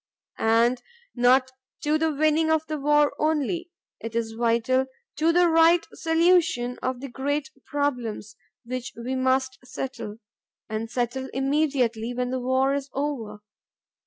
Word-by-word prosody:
And 235 +2 +3 0.3
not 255 +1 +4 0.3
to 300 +1 +2
the 320 0 +1
winning 310 +2 +2
of 315 0 +2
the 310 -1 -4
war 295 +1 +3
only. 315 +3 0 0.3
It 225 0 -7
is 230 -1 -1
vital 235 +3 +1 0.3
to 320 +2 +3
the 350 +1 +4
right 330 +1 +5
solution 325 -7 +2
of 255 -1 -2
the 275 - -5
great 275 +3 -2 0.2
problems 245 -7 -2 0.3
which 250 0 -5
we 240 +3 -4
must 260 0 0
settle, 250 -4 -6 0.5
and 220 +1 -4
settle 250 +2 -2
immediately, 265 -5 0
when 250 0 -2
the 260 - -1
war 260 +2 +1
is 280 0 -3
over. 235 -8 -4
265 Hz, 135 wpm, -25 LUFS, 240-300 Hz, 0.5 s, right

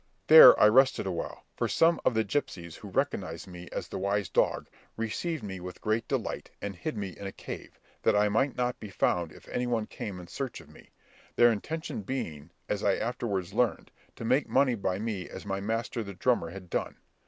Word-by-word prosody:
There 160 0 +10
I - - +8
rested 130 0 +4
awhile, 90 -3 -4
for - - 0
some 165 +1 +3
of 115 - +2
the 110 - +3
gipsies 90 - -3
who 105 - -10
recognised 95 - -2
me 90 -1 -10
as - - -4
the - - -5
wise 100 +1 0
dog, - - +1 0.3
received 140 +8 -2
me 95 -2 -5
with 90 0 -8
great 110 +1 -1
delight, - - -3
and 100 -1 -5
hid 115 - -4
me 100 -2 -3
in 100 +2 -8
a - - -5
cave, - - -9 0.2
that 110 - +3
I 105 0 +4
might 120 +5 +1
not 125 0 -1
be 105 - -8
found 85 -3 0
if - - -16
any 125 0 -1
one 115 -3 0
came 100 -3 -6
in 90 - -9
search 130 +7 -5
of 80 -3 -15
me; - - -17 0.5
their 120 0 +6
intention 155 +5 -4
being, 85 - -5 0.2
as 105 -1 -2
I 100 - +3
afterwards 105 -7 -2
learned, - - 0 0.2
to 115 - -7
make 130 +5 +2
money 135 -1 +3
by 95 -4 -1
me 105 -4 -4
as - - -9
my 95 -1 -2
master 115 +3 -2
the 100 -3 -7
drummer 120 -4 +1
had 90 0 -10
done. - - -2
105 Hz, 210 wpm, -29 LUFS, 95-120 Hz, 0.5 s, There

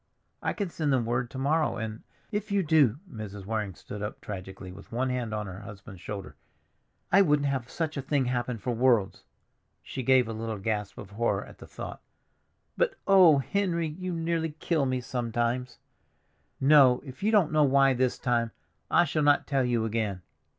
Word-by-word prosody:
I - - -1
can 200 -4 -3
send 155 -3 -1
them 130 -3 +2
word 120 +1 -1
to 130 - -9
morrow, 150 +4 +1
and—" 110 0 -5 0.3
"If 210 0 -3
you 200 -1 +2
do!" 150 -7 +4
Mrs. 105 - -8
Waring 105 -3 -3
stood 105 +3 -8
up 105 +1 -5
tragically 95 -1 -8
with 95 - -13
one 130 +3 0
hand 125 -3 -2
on 105 0 -3
her 95 -1 -8
husband's 100 -3 -11
shoulder. 100 0 -7 0.8
"I 195 - +7
wouldn't 145 -5 +3
have 130 -3 -2
such 155 -2 -3
a - - -1
thing 135 0 0
happen 125 -1 -1
for 120 +4 -3
worlds." 115 -5 +2 0.6
She 130 - -5
gave 130 -1 +4
a 115 - -4
little 110 0 -4
gasp 105 0 -3
of 100 - -9
horror 115 +3 0
at - - -15
the - - -11
thought. - - -8 0.7
"But, - - +1
oh, 185 -6 +7
Henry, 170 +1 0
you 185 +4 -5
nearly 165 -2 -1
kill 155 -6 +1
me 130 -1 -1
sometimes! 120 +1 -2 0.8
No, 135 -3 +6
if 130 +5 -10
you 210 +2 +2
don't 200 -9 +4
know 155 -1 +4
why 135 -1 +4
this 130 0 0
time, 120 -2 0 0.4
I 175 - +5
shall 155 0 -1
not 145 -1 +4
tell 135 -2 +1
you 120 -2 +1
again." 105 -4 -2
125 Hz, 185 wpm, -28 LUFS, 110-150 Hz, 0.8 s, I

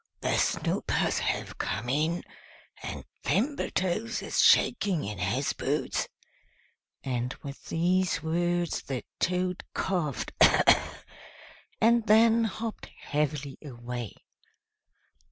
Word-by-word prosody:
The - - +1
Snoopers - - 0
have - - -2
come 120 - -2
in, 155 +6 0 0.6
and - - -6 0.2
Thimbletoes 220 - 0
is - - +1
shaking 185 -6 +4
in 100 -1 -5
his 90 +1 0
boots." - - -1 1.0
And 125 -1 -2
with 140 -1 -8
these 180 +2 +1
words 175 +1 0
the 130 -4 -4 0.2
Toad 180 0 0
coughed, 170 -8 -1 1.5
and 230 0 +4
then 225 +1 +5
hopped 225 +1 -5
heavily 145 -2 -2
away. 120 -4 -6
170 Hz, 95 wpm, -28 LUFS, 135-195 Hz, 1.5 s, then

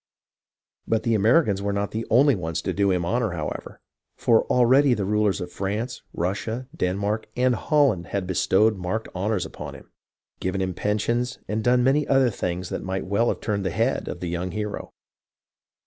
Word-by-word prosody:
But 110 - +1
the 115 - +1
Americans 110 - +3
were 100 0 -1
not 100 0 -2
the 110 +1 -4
only 140 +4 +5
ones 80 -5 -3
to - - -1
do 100 0 +2
him 90 -2 +1
honour, 115 0 0
however; 75 -3 -5 0.4
for 115 -2 +3
already 125 +2 +4
the 100 - -2
rulers 105 0 +1
of 90 -1 -6
France, 110 +6 -3
Russia, 110 +8 -3
Den 90 - 0
mark, 105 +2 -2
and 125 0 +3
Holland 120 - +2
had 100 -2 -2
bestowed 95 +4 +2
marked 95 +5 -3
honours 95 0 -1
upon - - -8
him, - - -15 0.5
given 95 +1 -2
him 95 -1 -1
pensions, 115 +6 -1
and 110 +2 -2
done 125 +2 +3
many 140 +3 +2
other 135 -3 +4
things 90 -2 -3
that - - -3
might 95 0 -3
well 100 +5 +1
have - - -1
turned 100 -3 -1
the 95 - 0
head - - 0
of - - -6
the 90 - -3
young 85 +2 -2
hero. 105 +3 -4
105 Hz, 185 wpm, -24 LUFS, 95-120 Hz, 0.5 s, only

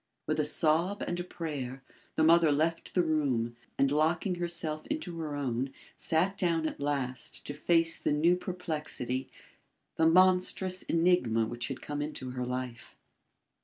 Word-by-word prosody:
With - - -1
a 150 - +2
sob 165 +6 +2
and 175 - -3
a - - -2
prayer, 140 -7 -5 0.3
the 155 - +2
mother 165 -1 +6
left 160 +3 -1
the 180 - +4
room, 135 -8 0 0.2
and 140 0 +3
locking 160 +6 +1
herself 170 -3 -2
into 180 - -4
her 150 -2 -4
own, 130 -1 -2 0.2
sat 180 +4 +1
down 165 -3 +1
at - - -6
last 140 -3 -3
to 145 - -4
face 165 +2 +2
the - - 0
new 160 +4 +4
perplexity, 155 -8 -3 0.7
the 160 - +4
monstrous 185 +1 +4
enigma 165 -10 +2
which 120 +2 -4
had 135 - -6
come 145 0 -4
into 145 -4 -5
her 125 -1 -4
life. 125 -2 -5
155 Hz, 155 wpm, -30 LUFS, 135-175 Hz, 0.7 s, mother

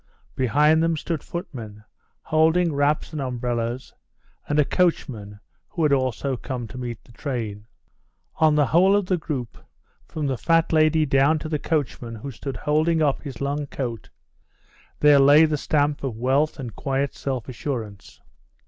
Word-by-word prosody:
Behind 150 +5 +3
them 165 -1 +1
stood 160 -1 -3
footmen, 115 -11 -7 0.4
holding 160 +2 +2
wraps 145 +3 0
and 150 - -3
umbrellas, 120 -1 -3 0.6
and 145 - +1
a 150 - +4
coachman, 115 - -1 0.3
who 165 - -2
had 150 -2 +3
also 130 0 0
come 125 -1 -5
to 115 - -9
meet 120 -3 -6
the - - -19
train. 115 -6 -5 0.7
On 155 -2 +4
the 150 -1 +4
whole 185 +7 +4
of 205 -2 +1
the 185 0 +1
group, 140 -7 -5 0.5
from 155 -2 -4
the 135 -3 -1
fat 165 -1 +2
lady 155 0 +4
down 140 +3 +3
to 155 - -5
the 150 -2 -1
coachman 130 -7 -2
who 135 +6 -7
stood 135 +1 -6
holding 155 +5 +1
up 140 -2 +1
his 135 -5 -8
long 140 +1 -2
coat, 120 -5 -5 0.9
there 145 -1 +7
lay 145 +3 +7
the 155 -1 0
stamp 145 0 0
of 125 -5 -3
wealth 135 +6 +1
and 125 -7 -7
quiet 135 0 -1
self 130 -4 -4
assurance. 115 -6 -6
140 Hz, 160 wpm, -23 LUFS, 125-155 Hz, 0.9 s, there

